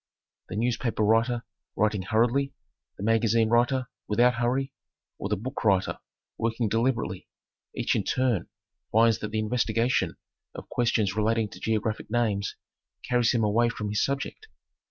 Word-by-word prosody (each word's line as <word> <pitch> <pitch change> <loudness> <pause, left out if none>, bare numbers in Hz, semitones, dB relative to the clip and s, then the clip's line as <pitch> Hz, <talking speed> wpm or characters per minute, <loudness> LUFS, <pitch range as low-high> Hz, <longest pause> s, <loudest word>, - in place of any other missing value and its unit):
The - - -5
newspaper 115 0 0
writer 115 +2 +2 0.3
writing 105 -2 +1
hurriedly, 120 +8 +1 0.4
the - - -6
magazine 115 0 +3
writer 125 +2 +2 0.2
without 120 +4 +4
hurry, 130 +3 -1 0.5
or 100 - -3
the 105 - +2
book 125 +7 -5
writer 95 -3 +2 0.4
working 115 0 0
deliberately, 115 -4 -1 0.5
each - - 0
in - - +1
turn 125 -8 0 0.4
finds 115 0 +4
that 105 - -4
the 110 - -3
investigation 115 +2 +1 0.4
of - - -8
questions 110 -5 +1
relating 110 0 +1
to - - -11
geographic 110 0 -1
names 105 -4 0 0.5
carries 120 -1 +2
him 115 -3 +1
away 115 +3 +3
from 105 -2 -4
his 105 +1 +1
subject. 140 - -3
115 Hz, 140 wpm, -27 LUFS, 105-120 Hz, 0.5 s, without